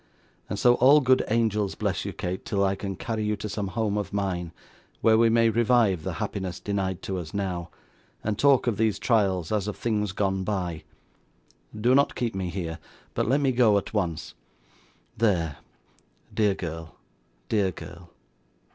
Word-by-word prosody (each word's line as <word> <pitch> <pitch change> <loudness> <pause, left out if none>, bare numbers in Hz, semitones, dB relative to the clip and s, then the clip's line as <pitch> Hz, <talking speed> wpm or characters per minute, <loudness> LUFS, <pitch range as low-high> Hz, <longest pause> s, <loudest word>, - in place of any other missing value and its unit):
And 105 - -3
so 120 +4 +5
all 140 +4 +7
good 130 -2 +3
angels 105 -3 +1
bless - - -2
you, - - -3
Kate, 90 +1 -4
till 100 -1 0
I 95 0 +2
can 95 0 -5
carry 110 +3 -3
you 105 0 0
to 105 - -5
some 105 -1 -3
home 105 0 -1
of 105 - -4
mine, 95 -4 -2 0.5
where 110 -1 +5
we 115 +1 +5
may 115 0 +4
revive 115 -5 +3
the - - -4
happiness 95 -3 -4
denied 95 -2 -2
to 95 -1 -3
us 85 +2 -8
now, 90 -4 -3 0.5
and 110 -1 -1
talk 140 +3 +4
of 120 -5 0
these 110 -2 +1
trials 95 -8 +1
as 105 -2 0
of 105 - -4
things 105 -4 -1
gone 95 -1 -1
by. 90 -5 -3 0.9
Do 120 +4 +3
not 140 +1 +3
keep 120 -2 -2
me 95 -2 -3
here, 85 -2 -4 0.3
but - - 0
let 140 +3 +3
me 135 -2 +3
go 120 -5 +4
at 100 - -4
once. 90 -7 -2 0.8
There. 85 -10 +1 0.8
Dear 105 -3 +2
girl 80 -2 -6 0.5
dear 100 -3 +2
girl. 85 -1 -10
100 Hz, 175 wpm, -26 LUFS, 95-115 Hz, 0.9 s, all